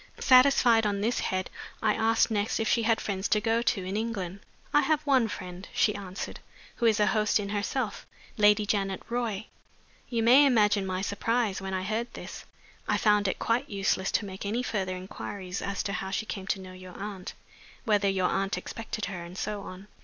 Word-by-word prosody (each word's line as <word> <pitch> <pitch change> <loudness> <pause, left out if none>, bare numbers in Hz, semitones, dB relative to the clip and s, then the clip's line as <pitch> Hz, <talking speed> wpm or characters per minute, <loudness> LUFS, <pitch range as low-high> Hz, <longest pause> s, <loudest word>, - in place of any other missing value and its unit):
Satisfied 255 -4 +5
on 200 -1 -1
this 230 +4 0
head, 185 0 -2 0.3
I 215 -1 +2
asked 225 +1 +2
next 205 0 0
if 220 - 0
she 235 - +3
had 225 0 +2
friends 195 -1 -2
to 210 - +3
go 225 +2 +1
to 225 -5 0
in 190 +2 -4
England. 200 -4 -3 0.3
"I 295 - +6
have 305 +1 +1
one 265 -5 +3
friend," 180 -3 -7
she 210 - +3
answered, 195 -2 -6 0.4
"who 235 - +2
is 220 -1 +3
a 210 - +5
host 215 +1 +2
in 200 -1 -4
herself 210 +2 -2 0.3
Lady 210 0 +4
Janet 195 -2 -1
Roy." 230 -4 -2 0.6
You 230 -2 0
may 260 +5 +7
imagine 210 -5 +3
my 185 0 -2
surprise 215 -1 0
when 190 0 -3
I 185 - -2
heard 220 +4 -2
this. - - -8 0.4
I - - +2
found 210 -2 +3
it 190 - -1
quite 240 +4 0
useless 195 -1 0
to 210 - +1
make 190 -1 -7
any 220 +5 -1
further 190 -6 -2
inquiries 185 0 -6
as 200 0 -2
to 200 - -3
how 190 - -3
she 205 +3 -2
came 195 -3 -6
to 200 - 0
know 185 -1 -10
your 185 -1 -11
aunt, 195 -2 -6 0.5
whether 205 -3 +3
your 190 -2 +1
aunt 195 +1 -1
expected 225 -1 -5
her, 180 -3 -5
and 175 +2 -10
so 210 0 -3
on. 190 +1 -10
205 Hz, 200 wpm, -28 LUFS, 190-225 Hz, 0.6 s, may